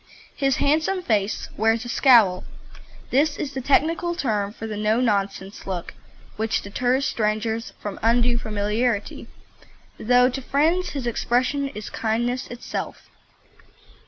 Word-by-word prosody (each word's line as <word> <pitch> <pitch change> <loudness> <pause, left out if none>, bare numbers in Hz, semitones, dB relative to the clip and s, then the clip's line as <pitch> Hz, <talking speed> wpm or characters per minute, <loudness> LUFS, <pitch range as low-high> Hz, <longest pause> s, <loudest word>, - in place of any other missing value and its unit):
His 275 -1 +1
handsome 320 +6 +1
face 210 - 0
wears 225 +2 +1
a - - -6
"scowl." 230 -8 +5 0.7
This 295 +3 +2
is 285 -2 -4
the 265 - -3
technical 330 +6 +1
term 210 - -1
for 225 - -8
the 215 -1 -4
"no 215 +2 +1
nonsense" 200 -4 -1
look 180 -3 -4 0.4
which 220 +1 -1
deters 250 +6 0
strangers 220 -1 -1
from 205 -2 -6
undue 235 +1 +3
familiarity, 210 +1 -2 0.7
though 250 +2 +4
to 265 +1 -3
friends 320 +8 +1
his 275 -4 -4
expression 255 +4 0
is 210 - -7
kindness 240 +3 -1
itself. 240 0 -6
240 Hz, 130 wpm, -23 LUFS, 215-270 Hz, 0.7 s, scowl